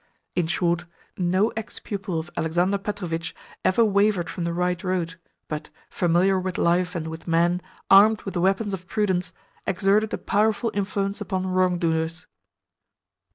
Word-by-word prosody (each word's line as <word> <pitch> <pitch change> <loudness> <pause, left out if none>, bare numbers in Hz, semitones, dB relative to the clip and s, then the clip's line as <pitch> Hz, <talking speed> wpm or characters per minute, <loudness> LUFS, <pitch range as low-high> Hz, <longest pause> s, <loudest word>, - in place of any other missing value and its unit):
In 175 -3 +1
short, 175 0 0 0.3
no 185 +4 +2
ex 220 -2 -6
pupil 195 -4 -4
of 160 +2 -7
Alexander 175 +5 +1
Petrovitch 180 -5 -4 0.3
ever 225 +5 +4
wavered 200 -3 +2
from 175 - -3
the 170 - -1
right 180 0 -1
road, 180 -3 -1 0.3
but, 150 0 -5 0.2
familiar 180 +2 +3
with 185 -1 -3
life 180 +1 +2
and 165 -2 -2
with 160 +1 -8
men, 170 +2 +2 0.3
armed 210 +3 +6
with 195 - -5
the 175 - -1
weapons 195 +2 +1
of 185 -1 -6
prudence, 190 -4 0 0.4
exerted 205 +3 +2
a - - -1
powerful 220 +2 +1
influence 200 0 -2
upon 190 -2 -2
wrongdoers. 175 -2 0
185 Hz, 150 wpm, -24 LUFS, 170-200 Hz, 0.4 s, armed